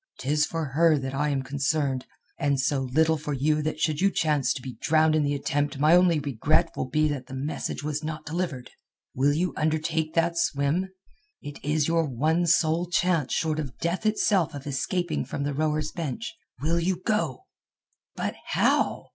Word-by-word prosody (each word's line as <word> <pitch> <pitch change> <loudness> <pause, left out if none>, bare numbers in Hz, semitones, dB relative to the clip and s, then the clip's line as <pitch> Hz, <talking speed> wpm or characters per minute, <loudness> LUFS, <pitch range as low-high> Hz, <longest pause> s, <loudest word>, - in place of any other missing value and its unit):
'Tis 150 +3 +1
for 165 -1 -3
her 160 +3 +4
that 135 -1 -4
I 145 +2 0
am 135 -2 -1
concerned, 140 -1 -1 0.3
and 140 -1 +1
so 135 +2 +1
little 160 +3 +3
for 150 0 -4
you 150 +3 +1
that 155 0 -3
should 155 0 0
you 195 - +5
chance 150 -8 +1
to 130 - -3
be 130 -2 -8
drowned 155 0 +3
in 155 - +3
the 145 0 0
attempt 145 0 -1
my 155 +4 +5
only 180 -2 +5
regret 150 +5 +1
will 130 - -3
be 155 +3 +2
that 135 -3 -4
the 130 - -7
message 145 +2 -3
was 150 0 -3
not 155 0 -5
delivered. 155 -6 -3 0.4
Will 140 +3 +2
you 170 +3 0
undertake 155 +1 -1
that 170 0 +2
swim? 155 +5 0 0.5
It 145 0 -9
is 150 +1 +1
your 165 0 +2
one 155 +7 +1
sole 165 +1 +3
chance 175 -5 +1
short 155 -1 0
of 135 -6 -5
death 175 +6 -1
itself 200 -6 +2
of 140 - -8
escaping 155 +4 -1
from 140 - -4
the 145 0 -1
rower's 155 +1 -1
bench. 170 - -4 0.3
Will 165 +2 +2
you 175 +1 0
go?" 165 - -1 0.7
"But - - -2
how?" - - +1
155 Hz, 185 wpm, -26 LUFS, 140-165 Hz, 0.7 s, you